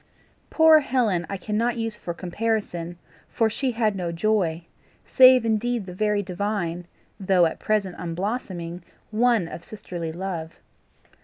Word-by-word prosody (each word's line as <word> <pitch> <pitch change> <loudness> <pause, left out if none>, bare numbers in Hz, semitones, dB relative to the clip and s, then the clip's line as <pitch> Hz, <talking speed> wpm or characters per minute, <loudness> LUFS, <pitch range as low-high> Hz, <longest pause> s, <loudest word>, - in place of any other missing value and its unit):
Poor 320 -1 +6
Helen 230 - 0
I 195 - -3
cannot 225 +5 -1
use 225 -1 -3
for 175 - -6
comparison, 175 -2 -3 0.3
for 225 -1 +1
she 265 +4 -1
had 220 -3 +1
no 175 -3 -3
joy, 170 -2 0 0.4
save 255 -2 +6
indeed 225 0 0
the 180 - -8
very 210 +1 0
divine, 180 -2 -3 0.3
though 185 -2 +3
at 160 - -2
present 205 -4 0
unblossoming 180 -1 -4 0.3
one 225 -4 +2
of 165 +1 -8
sisterly 175 -5 -6
love. 170 -2 -5
200 Hz, 135 wpm, -24 LUFS, 175-225 Hz, 0.4 s, Poor